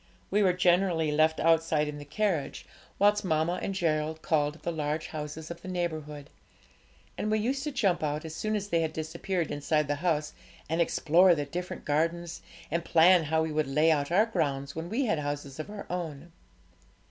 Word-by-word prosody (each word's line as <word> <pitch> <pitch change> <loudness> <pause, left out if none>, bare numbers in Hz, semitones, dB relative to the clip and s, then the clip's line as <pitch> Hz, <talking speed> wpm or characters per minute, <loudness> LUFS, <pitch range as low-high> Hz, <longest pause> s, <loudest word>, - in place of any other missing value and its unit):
We 205 +2 +3
were 190 -2 +4
generally 175 -3 +2
left 155 +1 +3
outside 165 -2 +2
in 150 0 -5
the 145 - -9
carriage, 165 -3 -2 0.3
whilst 205 +1 +3
mamma 160 0 0
and 195 - -3
Gerald 160 -2 -1
called 150 -2 +1
at - - -18
the 170 - -1
large 155 0 -2
houses 155 +1 -6
of 170 0 -8
the - - -10
neighbourhood; 155 -5 -4 0.9
and 215 - -1
we 215 - +2
used 260 +6 -1
to 300 - -2
jump 195 -9 +1
out, 150 +1 -2
as 160 - -6
soon 215 +5 -2
as 205 -1 -3
they 170 -2 +2
had 160 -1 -2
disappeared 165 +2 -3
inside 150 +1 0
the 145 - +1
house, 155 -4 0 0.3
and 165 +3 0
explore 170 +2 +4
the 145 -2 -2
different 180 +5 -6
gardens, 165 +3 -1 0.3
and 170 +1 0
plan 170 +1 +5
how 160 +1 +1
we 160 - -3
would 155 -1 0
lay 150 +4 +3
out 145 0 0
our 200 +5 +5
grounds 140 -10 -2
when 165 +2 -5
we 255 +6 0
had 165 -9 +1
houses 145 -1 -5
of 155 - -5
our 210 -1 -7
own. 170 -3 -5
160 Hz, 195 wpm, -29 LUFS, 150-180 Hz, 0.9 s, plan